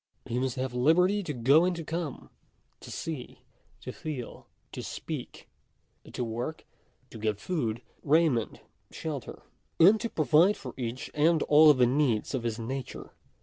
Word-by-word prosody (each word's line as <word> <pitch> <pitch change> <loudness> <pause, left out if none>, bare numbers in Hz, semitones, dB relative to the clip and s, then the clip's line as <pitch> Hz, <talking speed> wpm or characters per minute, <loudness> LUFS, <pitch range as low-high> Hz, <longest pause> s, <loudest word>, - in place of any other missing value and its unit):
He 120 - -2
must 130 -2 -1
have 130 -1 -3
liberty 180 +11 +3
to 175 - -4
go 140 +5 +4
and 180 0 +1
to 170 - -5
come, 165 -3 -5 0.5
to - - -12
see, 155 -7 -6 0.4
to - - -6
feel, 140 -7 -7 0.2
to - - -6
speak, - - -7 0.6
to 125 - -3
work; 120 +7 -5 0.5
to 110 - -9
get 105 -1 -1
food, 120 -9 -2 0.2
raiment, 150 -6 +2 0.3
shelter, 150 -6 -6 0.3
1 165 - +7
and 220 +1 +2
to 230 - -2
provide 160 +5 +3
for 125 - -8
each 125 0 -5
and 160 +1 +3
all 150 +1 +7
of 145 - +6
the 125 - +5
needs 125 -3 +1
of 130 - -1
his 115 -2 -3
nature. 130 +3 -6
140 Hz, 160 wpm, -28 LUFS, 120-160 Hz, 0.6 s, 1